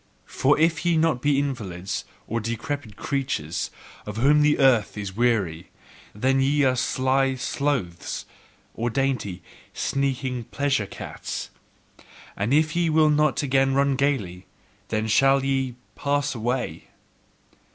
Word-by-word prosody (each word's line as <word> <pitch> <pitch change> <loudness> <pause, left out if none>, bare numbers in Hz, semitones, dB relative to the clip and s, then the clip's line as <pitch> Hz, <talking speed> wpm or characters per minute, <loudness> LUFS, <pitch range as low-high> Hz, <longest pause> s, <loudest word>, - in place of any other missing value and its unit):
For 140 +2 +2
if 160 0 +2
ye 175 -1 +2
be - - +2
not 160 -6 +1
invalids, 105 -10 -1 0.2
or 115 - -2
decrepit 115 +1 -4
creatures, 130 - -2 0.4
of 105 0 -5
whom 145 +5 +4
the 150 0 +4
earth 125 -7 +3
is 100 -2 -5
weary, 105 -9 0 0.5
then 130 +5 +2
are - - +3
ye 135 -1 +3
sly 130 +1 +1
sloths, 125 - -2 0.5
or 120 +1 -2
dainty, 120 -9 -1 0.3
sneaking 130 -3 -1
pleasure 130 -1 0
cats. - - -6 0.8
And 100 +5 -1
if 155 +2 +3
ye 170 -1 +2
will 155 -1 +4
not 150 -1 +2
again 135 -1 +2
RUN 140 0 +3
gaily, 110 -11 -1 0.4
then 110 0 -1
shall 135 +4 +4
ye 135 -2 0 0.2
pass 145 0 0
away! 120 +2 -3
135 Hz, 130 wpm, -24 LUFS, 110-140 Hz, 0.8 s, whom